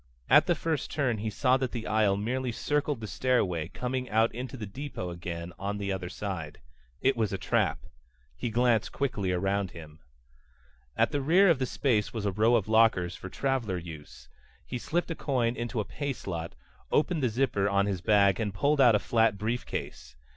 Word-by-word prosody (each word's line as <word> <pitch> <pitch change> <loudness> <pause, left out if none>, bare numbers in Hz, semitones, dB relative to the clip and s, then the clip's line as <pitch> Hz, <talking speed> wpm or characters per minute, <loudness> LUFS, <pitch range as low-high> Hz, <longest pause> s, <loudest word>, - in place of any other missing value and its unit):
At - - +7
the 175 - +3
first 160 -2 -2
turn 125 -7 0
he 110 +1 -2
saw 125 +5 +2
that 130 -2 -3
the 115 -2 -4
aisle 105 -2 +2
merely 125 +4 -2
circled 145 +1 -1
the - - -4
stairway, 95 -8 0
coming 125 +5 -3
out 110 +2 +2
into 125 +3 -6
the 110 - -5
depot 100 -4 -6
again 85 0 -6
on 100 +1 -3
the 100 -1 -3
other 95 -2 -3
side. 90 -6 -5 0.4
It 135 +1 +3
was 110 -4 0
a 100 - -1
trap. - - 0 0.5
He 120 - -3
glanced 115 -1 +2
quickly 105 -9 -1
around 95 +1 0
him. 80 -1 -11 1.0
At - - +3
the 145 - 0
rear 175 +7 +5
of 150 - +1
the 130 - 0
space 115 -5 0
was 110 -2 -3
a 100 - +1
row 110 +5 +3
of 110 -4 +1
lockers 110 -6 +3
for 95 +1 -8
traveler 125 -6 -1
use. 75 -7 -10 0.4
He 125 - -4
slipped 170 +6 -1
a - - -2
coin 125 -6 0
into 120 0 -3
a 105 - -1
pay 140 +8 -3
slot, 85 -7 -6 0.4
opened 155 +1 +2
the 125 - +2
zipper 110 -4 +1
on 100 0 +2
his 95 -3 -2
bag 100 0 +4
and 105 -3 -2
pulled 145 +6 +2
out 120 -4 +7
a - - +6
flat 110 0 +2
briefcase. 105 - -4
110 Hz, 195 wpm, -29 LUFS, 95-130 Hz, 1.0 s, At